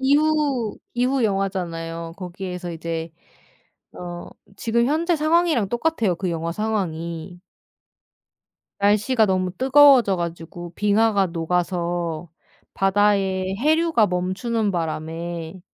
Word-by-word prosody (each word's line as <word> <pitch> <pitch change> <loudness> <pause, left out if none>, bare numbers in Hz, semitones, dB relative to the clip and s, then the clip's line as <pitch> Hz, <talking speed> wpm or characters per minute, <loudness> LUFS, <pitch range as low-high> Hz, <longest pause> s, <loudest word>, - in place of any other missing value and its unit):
기후 285 -4 +2 0.2
기후 250 +2 +1
영화잖아요. 170 -5 -2
거기에서 180 -1 -6
이제 165 0 -5 0.8
어 175 -1 -8 0.3
지금 235 +1 +1
현재 330 +5 +1
상황이랑 310 - +2
똑같아요 240 - 0
그 180 +1 -3
영화 165 0 -3
상황이. 175 -4 -3 1.4
날씨가 210 +4 +3
너무 185 -2 0
뜨거워져 265 -5 +6
가지고 170 0 -6
빙하가 205 -1 +2
녹아서 170 -1 -2 0.4
바다에 195 -1 +1
해류가 310 -3 +3
멈추는 200 +5 -1
바람에 165 +1 -4
190 Hz, 245 characters per minute, -22 LUFS, 170-235 Hz, 1.4 s, 뜨거워져